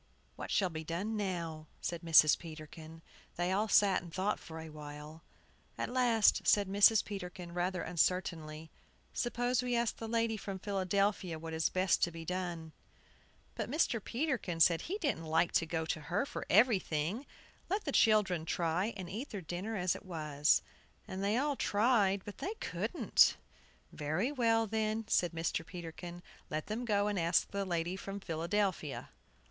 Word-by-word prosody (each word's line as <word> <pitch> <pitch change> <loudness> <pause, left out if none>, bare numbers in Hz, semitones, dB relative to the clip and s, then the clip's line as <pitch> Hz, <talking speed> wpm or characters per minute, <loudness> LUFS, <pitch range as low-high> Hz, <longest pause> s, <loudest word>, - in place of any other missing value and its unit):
"What - - -7
shall 190 -3 +1
be 160 0 -5
done 185 +8 -3
now?" 170 -6 -3
said 170 -1 -3
Mrs. 155 -3 +7
Peterkin. 160 0 -10 0.3
They 175 +1 0
all 205 +3 +1
sat 200 -2 +4
and 175 -1 -11
thought 190 +4 -1
for 160 - -10
a - - -6
little 155 -1 -10
while. 150 +2 -9 0.5
At - - -3
last 240 -4 +4
said 205 -2 +4
Mrs. 205 +2 +5
Peterkin, 180 -3 -7
rather 180 +1 -1
uncertainly, 160 -3 -1 0.4
"Suppose 245 +1 0
we 250 -1 -1
ask 235 -1 0
the 225 - -6
lady 230 -1 0
from 195 -2 -5
Philadelphia 195 -2 0
what 160 0 -7
is 160 0 +1
best 185 0 +2
to - - +3
be 165 -1 -8
done." 175 -2 -4 0.8
But - - -4
Mr. 235 - +1
Peterkin 240 - -2
said 165 0 +5
he 385 +5 -3
didn't 280 - -1
like 160 +2 +2
to 165 - +1
go 160 0 -2
to 160 0 -2
her 180 - -1
for - - -6
everything; 205 - +2 0.4
let 405 +3 0
the 285 - -1
children 210 -9 +3
try 175 +6 -1
and 185 -2 -6
eat 220 +10 -5
their 205 - -5
dinner 180 +7 -4
as 180 -3 +1
it - - -9
was. 150 -5 +1 0.4
And 190 +1 -4
they 205 +3 +2
all 285 +2 +1
tried, 205 -4 +2
but 205 - -9
they 415 +4 -3
couldn't. - - +2 0.5
"Very 160 - -1
well, 230 -4 +2
then." 220 0 -1
said 175 -5 +2
Mr. 165 0 -2
Peterkin, 175 0 -8 0.3
"let 155 0 -3
them 225 +3 -3
go 205 -2 +2
and 205 -2 0
ask 170 0 +2
the 200 0 -2
lady 175 0 -1
from 195 +1 -6
Philadelphia." 170 -2 -2
185 Hz, 170 wpm, -33 LUFS, 165-215 Hz, 0.8 s, Mrs